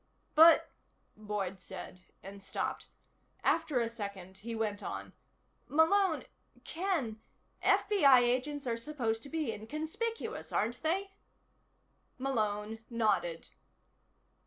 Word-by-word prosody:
"But," 325 +2 +7 0.4
Boyd 205 -3 -3
said, 185 0 -9 0.2
and 195 +1 -9
stopped. 195 - -3 0.6
After 320 -6 +2
a 230 - +1
second 200 -4 -7
he 230 +3 -5
went 215 -2 -2
on: - - -6 0.5
"Malone 325 +3 +3 0.4
Ken 315 - -2 0.4
FBI 280 -12 +6
agents 255 +4 0
are 235 -2 -1
supposed 230 -4 -2
to 280 - -10
be 310 -7 -1
inconspicuous, 315 - -4
aren't 240 +3 0
they?" 385 +5 0 1.1
Malone 220 -5 -1
nodded. 205 -8 0
235 Hz, 100 wpm, -32 LUFS, 210-315 Hz, 1.1 s, But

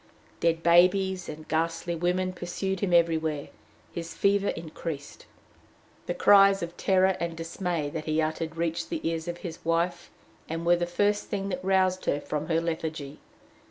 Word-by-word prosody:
Dead 165 0 +1
babies 185 +2 +4
and 155 0 -8
ghastly 165 +2 -1
women 180 +2 0
pursued 185 +2 -3
him 190 -1 -1
everywhere. 160 -3 +2 0.4
His 170 -1 -6
fever 200 0 +2
increased. 160 -2 -6 0.8
The - - -1
cries 195 -2 +6
of 170 0 -6
terror 190 0 +3
and 170 -1 -3
dismay 165 -2 -3
that 155 0 -5
he 155 0 0
uttered 160 +1 -2
reached 165 0 -2
the 165 -1 -2
ears 165 0 -2
of 175 0 -3
his 165 - -7
wife, 170 +1 0 0.4
and 165 +1 -3
were 175 +1 +5
the 175 0 -1
first 205 +4 +1
thing 195 -1 -3
that 180 -1 -4
roused 185 -1 +2
her 145 - +1
from 150 +1 -4
her 165 -1 +2
lethargy. 160 -3 -4
170 Hz, 160 wpm, -27 LUFS, 160-185 Hz, 0.8 s, cries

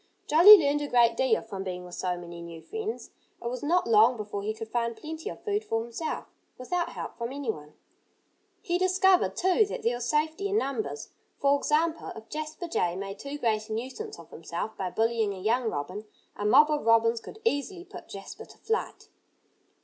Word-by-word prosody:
Jolly 355 +8 +10
learned 295 -3 +1
a 290 - -2
great 235 -3 +4
deal 255 -3 +2
from 195 -3 -6
being 180 -1 -5
with 180 - -11
so 180 0 -2
many 170 -1 -9
new 170 -1 -9
friends. 440 - -5 0.3
It 235 - -4
was 250 0 -5
not 345 +5 +2
long 230 +2 +5
before 205 -1 -5
he 210 +2 -2
could 220 +1 -7
find 235 -1 -1
plenty 315 +1 -6
of - - -10
food 415 0 -1
for 225 - -1
himself, 235 +7 -4 0.3
without 345 +8 -2
help - - -7
from 235 +1 -3
anyone. 220 - -5 0.9
He 350 +1 0
discovered, 370 0 +3
too, 375 +4 +3
that - - -6
there 235 - +2
was 245 0 -4
safety 315 +6 0
in 405 - +1
numbers. 430 +7 -3 0.3
For 280 0 +3
example, 315 +3 0
if 225 0 -11
Jasper 310 +3 -5
Jay 175 - 0
made 195 +1 -6
too 280 +1 -6
great 220 -5 0
a - - -3
nuisance 265 - -5
of - - -14
himself 220 - -5
by 185 -2 -3
bullying 225 0 0
a - - -9
young 225 +4 +1
robin, 185 +9 -5 0.3
a 205 - -4
mob 295 +7 +6
of 300 - 0
robins 230 0 +4
could - - -11
easily 350 0 -1
put - - -11
Jasper - - -9
to - - -17
flight. 450 0 -3
245 Hz, 195 wpm, -28 LUFS, 215-320 Hz, 0.9 s, Jolly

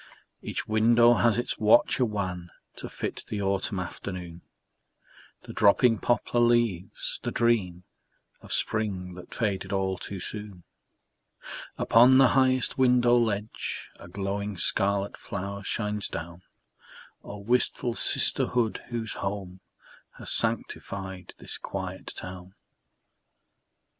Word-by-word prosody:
Each - - -4
window 115 +2 +5
has 120 -2 +2
its 120 - -2
watcher 115 +4 +4
wan 90 -5 -4 0.3
To - - -6
fit - - -5
the 105 - -4
autumn 100 0 -1
afternoon, 90 -1 -7 1.0
The - - -10
dropping 115 +2 +4
poplar 120 0 0
leaves, 120 -6 +1
the - - -3
dream 100 -7 0 0.6
Of - - -13
spring 95 -4 -2
that 90 0 -12
faded 100 -5 -2
all 95 -2 -1
too 100 +1 -6
soon. 105 -2 -6 1.1
Upon 125 +3 +6
the 130 -2 +6
highest 130 -1 +2
window 125 -2 +4
ledge 110 -2 -2
A - - -11
glowing 100 +2 -4
scarlet 100 +2 +1
flower 100 +2 -6
shines 105 +1 -1
down. 85 +2 -7 0.8
Oh, 105 - -8
wistful 120 +2 0
sisterhood, 120 -1 +3
whose 115 -2 -3
home 95 -2 -5 0.6
Has - - -7
sanctified 95 -2 -3
this - - -5
quiet - - -6
town! 90 +1 -9
100 Hz, 115 wpm, -27 LUFS, 95-120 Hz, 1.1 s, Upon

